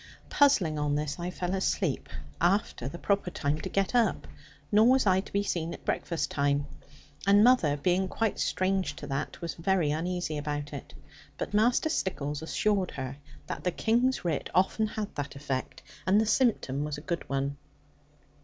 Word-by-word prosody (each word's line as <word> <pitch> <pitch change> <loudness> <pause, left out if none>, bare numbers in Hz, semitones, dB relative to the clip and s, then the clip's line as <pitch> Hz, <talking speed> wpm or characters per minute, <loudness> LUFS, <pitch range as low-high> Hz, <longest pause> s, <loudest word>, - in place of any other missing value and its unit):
Puzzling 185 - +4
on 145 -1 +1
this, 150 +2 -2
I 175 +1 -3
fell 180 0 -3
asleep, 190 - 0 0.3
after 175 - +1
the 140 - -6
proper 200 0 0
time 150 -3 -1
to - - -4
get 195 +2 0
up; 240 -2 +2 0.4
nor 215 +2 +6
was 260 0 +4
I 190 -1 +4
to - - -14
be 200 0 +1
seen 170 -4 -2
at - - -16
breakfast 170 -2 -1
time; 140 0 +1 0.6
and 200 +1 +7
mother 220 - +4
(being 180 +5 +1
quite 225 +3 -1
strange 185 -4 0
to 150 - -8
that) 140 +2 -3
was 170 - -3
very 170 -3 +1
uneasy 160 -1 -2
about 145 0 -4
it. 140 - -8 0.4
But - - -4
Master 240 +8 +3
Stickles 150 - -2
assured 195 +3 0
her 135 0 -5 0.3
that - - -5
the 180 - +2
King's 235 +4 +1
writ 160 -5 -1
often 195 +4 +3
had 210 -1 -5
that 145 0 -5
effect, 140 -2 -4 0.2
and 195 +3 +5
the 220 - +2
symptom 210 - +1
was 150 -1 -3
a - - -8
good 170 -1 -4
one. 140 +1 -1
175 Hz, 175 wpm, -29 LUFS, 145-200 Hz, 0.6 s, and